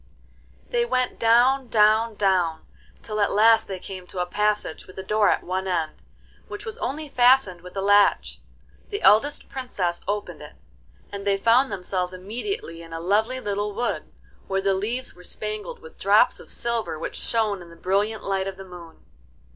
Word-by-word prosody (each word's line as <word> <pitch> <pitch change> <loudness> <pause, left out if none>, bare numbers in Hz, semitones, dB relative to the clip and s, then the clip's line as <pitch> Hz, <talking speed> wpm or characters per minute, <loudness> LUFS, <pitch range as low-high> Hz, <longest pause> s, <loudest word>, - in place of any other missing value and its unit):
VII - - -31
They 480 -1 +2
went 255 - -1
down, 245 +3 +4
down, 220 0 +3
down, 185 -5 +1 0.4
till 215 -1 -4
at 205 - +2
last 225 +2 +5
they 190 - -4
came 185 0 -9
to - - -10
a 180 - +1
passage 210 -1 -1
with 185 - -15
a 190 - -5
door 210 0 +2
at - - +1
one 190 +1 -3
end, 165 -4 0 0.6
which 410 +2 -8
was 450 +1 -7
only 300 +2 -3
fastened 245 -9 +4
with 180 +2 -11
a - - 0
latch. 205 0 +3 0.5
The 410 0 -4
eldest 275 +8 +4
Princess 190 -10 -3
opened 200 -6 -3
it, 150 0 -11 0.6
and 200 0 -6
they 200 -1 +3
found 235 +6 +3
themselves 180 -1 -2
immediately 200 - -5
in 165 0 -11
a 165 - -4
lovely 215 +9 +1
little 205 -2 -3
wood, 240 +2 -2 0.4
where 195 0 0
the 195 0 +1
leaves 225 +7 -3
were 180 - -16
spangled 215 - -5
with 475 0 -15
drops - - +4
of - - -13
silver 235 -8 -2
which - - -5
shone 215 -4 0
in 170 - -12
the 170 - -14
brilliant 200 +5 -1
light 195 -1 -1
of 195 -1 -6
the 195 - -9
moon. 175 -3 -13
205 Hz, 185 wpm, -24 LUFS, 185-235 Hz, 0.6 s, last